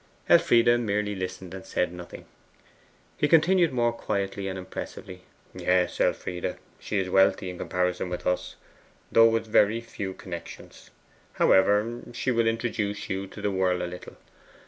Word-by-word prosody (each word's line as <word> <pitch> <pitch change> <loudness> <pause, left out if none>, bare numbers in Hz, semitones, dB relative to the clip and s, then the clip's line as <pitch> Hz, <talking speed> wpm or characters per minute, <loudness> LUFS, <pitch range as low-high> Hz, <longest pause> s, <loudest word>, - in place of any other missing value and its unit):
Elfride 120 0 +5
merely 105 -2 -1
listened 95 -1 -6
and 95 -1 -8
said 90 - -1
nothing. 90 -1 -10 0.9
He 150 - +2
continued 170 +1 +4
more 120 -2 +1
quietly 100 -3 -3
and 95 0 -4
impressively. 90 0 -8 0.3
'Yes, 90 -1 +1
Elfride, 90 -1 -1 0.2
she 105 - -3
is 95 -1 0
wealthy 95 0 +3
in 90 - -10
comparison 90 0 -1
with 90 - -5
us, 90 - -1 0.6
though 115 0 +7
with 115 -1 -2 0.3
few 95 -4 -6
connections. 85 -2 -10 0.4
However, 105 +5 +3
she 125 +2 -1
will 115 -1 +2
introduce 115 -3 -2
you 95 +1 -3
to - - -11
the 105 - +1
world 90 -2 +1
a - - -1
little. 90 0 -9
95 Hz, 145 wpm, -26 LUFS, 90-115 Hz, 0.9 s, though